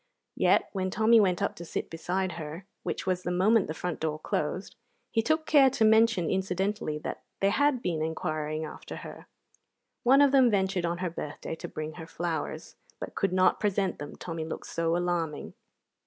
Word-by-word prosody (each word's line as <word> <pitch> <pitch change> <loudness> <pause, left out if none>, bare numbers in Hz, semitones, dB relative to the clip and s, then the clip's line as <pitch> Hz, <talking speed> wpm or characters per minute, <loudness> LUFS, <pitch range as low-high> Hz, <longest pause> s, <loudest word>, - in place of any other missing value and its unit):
Yet - - +3
when 190 -1 -1
Tommy 225 +3 +5
went 185 -4 +2
up - - -1
to 170 - -7
sit 170 - -4
beside 180 +3 -2
her, 165 +2 -7 0.2
which - - -4
was 185 -1 0
the 175 - -3
moment 195 +4 +3
the 155 - -4
front 180 -1 -3
door 155 -1 -1
closed, 155 +4 -3 0.4
he 225 - +2
took 315 +6 +1
care 280 -3 +6
to 245 -4 +2
mention, 220 -5 +4
incidentally, 190 -2 -1
that 150 - -5 0.2
they 195 0 +3
had 280 -1 +2
been 165 -3 -1
inquiring 155 -1 -2
after - - -8
her. - - -10 0.7
One 270 +3 +6
of 280 - +4
them 265 -3 +6
ventured 190 -4 +1
on 170 +1 -2
her 175 - -2
birthday 150 -1 -6
to 160 - -6
bring 155 0 -5
her 160 - -8
flowers, 165 -2 -4 0.2
but - - -6
could 195 - 0
not 185 0 +3
present 200 -2 0
them, 145 0 -7
Tommy 165 -2 -5
looked 160 - -6
so 165 0 0
alarming. 170 -4 -2
180 Hz, 185 wpm, -28 LUFS, 160-210 Hz, 0.7 s, care